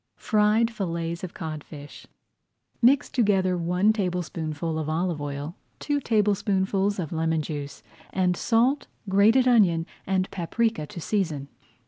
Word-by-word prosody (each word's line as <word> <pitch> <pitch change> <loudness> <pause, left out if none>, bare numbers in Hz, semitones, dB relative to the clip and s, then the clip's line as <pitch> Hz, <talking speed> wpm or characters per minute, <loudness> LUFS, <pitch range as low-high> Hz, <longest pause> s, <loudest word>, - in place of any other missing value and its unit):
FRIED 215 +2 +2
FILLETS 170 -5 -3
OF 180 - -6
CODFISH 150 -2 -8 0.7
Mix 255 +3 +4
together 195 -6 +2
one 180 +5 +2
tablespoonful 165 -5 -3
of 155 -1 -3
olive 165 -1 -1
oil, 145 +3 -5 0.2
two 290 -1 -1
tablespoonfuls 200 -3 +1
of 170 -6 -4
lemon 160 -1 0
juice, 145 -2 -6 0.3
and 180 -1 +1
salt, 245 +8 +1 0.2
grated 215 +7 +4
onion, 185 -9 +4 0.2
and 190 -1 0
paprika 195 -1 -1
to 170 - -8
season. 160 -7 -2
185 Hz, 120 wpm, -25 LUFS, 160-210 Hz, 0.7 s, Mix